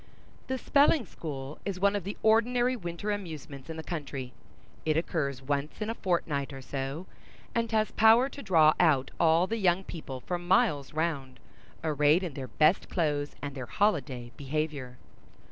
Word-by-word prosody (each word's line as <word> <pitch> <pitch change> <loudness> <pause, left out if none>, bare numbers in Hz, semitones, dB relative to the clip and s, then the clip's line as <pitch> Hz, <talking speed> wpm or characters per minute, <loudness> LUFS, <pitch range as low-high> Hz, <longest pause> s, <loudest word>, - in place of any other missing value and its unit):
The 260 - -1
spelling 285 0 +3
school 145 -5 -7
is 195 -2 -3
one 200 +1 +3
of 200 -4 -3
the 200 - -5
ordinary 240 +3 +3
winter 175 0 -4
amusements 155 -8 -6
in 160 - -5
the 160 - -5
country. 140 -6 -5 0.5
It 155 -1 +1
occurs 140 -6 -1
once 145 +2 -2
in 215 +1 -2
a - - -2
fortnight, 160 -9 -1
or 135 -1 -8
so, 135 +6 -4 0.5
and 230 -1 0
has 215 -1 +1
power 225 +4 +6
to 280 0 -9
draw 160 - +5
out 145 -7 +3
all 165 +2 +4
the 225 +4 -2
young 185 -2 +2
people 145 -8 -7
for 175 +7 -3
miles 175 - +2
round, 150 -5 -2 0.4
arrayed 150 +2 +3
in 170 -5 -4
their 135 -1 -6
best 155 +7 +2
clothes 145 -4 -1
and 145 -1 -4
their 130 -3 -6
holiday 135 - 0
behavior. 140 -3 -3
160 Hz, 165 wpm, -29 LUFS, 140-200 Hz, 0.5 s, power